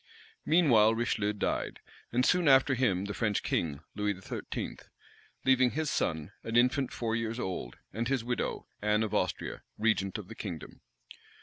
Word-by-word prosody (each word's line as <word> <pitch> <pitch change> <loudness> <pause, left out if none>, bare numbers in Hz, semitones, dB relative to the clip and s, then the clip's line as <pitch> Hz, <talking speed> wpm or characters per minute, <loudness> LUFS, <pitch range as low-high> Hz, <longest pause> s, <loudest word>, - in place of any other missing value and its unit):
Meanwhile 120 -10 +5
Richelieu 110 -3 0
died, 105 - -2 0.3
and 125 +2 +2
soon 180 -3 +3
after 135 0 +6
him 100 -7 +1
the 100 - -4
French 105 -2 0
king, 75 -3 -1
Louis 105 -2 -1
XIII., 95 - -5 0.7
leaving 130 -1 +5
his 155 +3 -1
son, 80 +1 -1
an 115 - -4
infant 125 +2 +3
four 115 -1 -2
years 115 +1 -2
old, 90 - -4 0.2
and 115 +3 -1
his 130 -3 0
widow, 125 +1 -2 0.2
Anne 105 +1 +2
of 110 -1 -3
Austria, 90 -4 -1 0.2
regent 105 -2 +1
of 105 -4 -8
the 115 - -8
kingdom. 90 -8 -7
115 Hz, 160 wpm, -30 LUFS, 100-125 Hz, 0.7 s, after